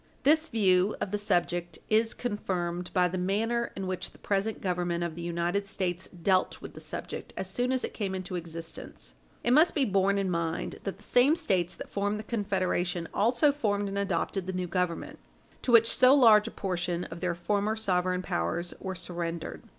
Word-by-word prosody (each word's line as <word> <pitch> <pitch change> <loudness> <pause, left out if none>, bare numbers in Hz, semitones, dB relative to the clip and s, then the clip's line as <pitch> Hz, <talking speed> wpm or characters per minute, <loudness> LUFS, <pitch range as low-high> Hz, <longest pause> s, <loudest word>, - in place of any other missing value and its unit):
This 315 +3 +4
view 190 -2 +3
of 190 - -3
the 210 - 0
subject 175 -3 0
is 220 +1 +2
confirmed 180 -6 -3
by 180 -1 +3
the 180 +1 -3
manner 225 +6 0
in 195 - -4
which 185 -1 -4
the - - -17
present 205 +2 -1
Government 175 -2 -1
of 170 -2 -3
the 170 - -7
United 175 +4 -1
States 185 -2 -2
dealt 185 +1 +1
with - - -9
the - - -10
subject - - -6
as 190 - -2
soon 245 +7 -1
as 260 -1 +1
it - - -4
came 195 -3 -2
into 185 -1 -5
existence. 165 -1 -7 0.3
It 240 - +2
must 320 +4 +5
be 285 -4 +3
borne 195 -1 +2
in 195 -2 0
mind 170 -1 -2
that 195 -1 -3
the 205 - -17
same 260 +6 +4
States 180 - 0
that - - -8
formed 205 +1 -1
the 215 - -6
Confederation 185 -5 -1
also 240 +7 +3
formed 205 -8 -1
and 195 - -4
adopted 190 -1 -1
the 190 - -2
new 180 0 -2
Government, 180 -1 -2 0.4
to 250 - -1
which 230 -1 +6
so 255 +2 +7
large 225 -5 +7
a - - -5
portion 175 -2 -2
of 165 0 -8
their 175 0 -1
former 205 +5 0
sovereign 185 -3 0
powers 170 - -2
were 190 -1 -4
surrendered. 170 -1 -4
190 Hz, 195 wpm, -29 LUFS, 175-215 Hz, 0.4 s, so